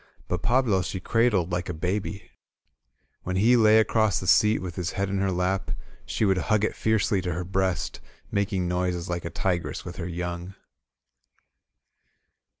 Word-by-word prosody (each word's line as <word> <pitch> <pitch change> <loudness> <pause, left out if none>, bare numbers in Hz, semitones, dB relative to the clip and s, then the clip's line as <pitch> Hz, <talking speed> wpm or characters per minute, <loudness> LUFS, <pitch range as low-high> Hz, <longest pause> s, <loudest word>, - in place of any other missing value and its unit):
But 90 -1 -2
Pablo 120 -6 +2
she 90 +2 -4
cradled 105 -4 +1
like 90 0 -2
a 90 - -3
baby. 95 +4 -3 0.9
When 95 - -3
he 115 +6 +5
lay 110 -2 +6
across 110 -3 +3
the - - -6
seat 105 +4 +5
with 90 -2 -6
his 90 -2 -3
head 100 0 -1
in 100 0 -1
her 95 0 +1
lap, 90 +2 -1 0.4
she - - 0
would 95 -2 +2
hug 105 +3 +1
it 110 - 0
fiercely 105 -3 +1
to 90 -1 -2
her 90 +2 -3
breast, 95 -2 -1 0.3
making 100 -3 0
noises 90 -1 -1
like 85 -1 -3
a - - -2
tigress 85 +1 -2
with 90 0 -7
her 85 -2 -4
young. 90 +2 -5
95 Hz, 165 wpm, -26 LUFS, 90-105 Hz, 0.9 s, lay